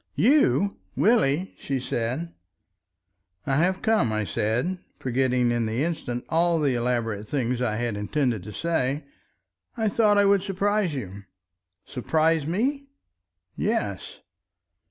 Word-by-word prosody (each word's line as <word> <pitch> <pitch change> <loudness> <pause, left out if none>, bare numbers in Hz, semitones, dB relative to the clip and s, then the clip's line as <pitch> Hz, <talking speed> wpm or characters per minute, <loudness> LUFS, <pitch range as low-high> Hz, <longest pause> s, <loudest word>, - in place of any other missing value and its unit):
"You, 200 - +3 0.2
Willie!" 190 - +2
she 135 -1 -2
said. 125 +7 -3 1.1
"I 135 - +1
have 185 +4 +1
come," 220 - +2
I 110 0 0
said—forgetting 125 - -1
in 120 -1 0
the 115 +6 -1
instant 155 -7 -3
all 170 0 +2
the 145 -4 +2
elaborate 115 -4 -1
things 125 -3 -1
I 115 -4 0
had 120 -1 -2
intended 115 +2 -1
to 105 - -7
say. 145 0 -1 0.7
"I 220 -2 +1
thought 210 -1 +3
I 205 - +5
would 200 -1 +4
surprise 200 -2 0
you—" 100 -5 -7 0.6
"Surprise 155 +3 +1
me?" 270 - -1 0.7
"Yes." - - -2
140 Hz, 120 wpm, -25 LUFS, 120-185 Hz, 1.1 s, I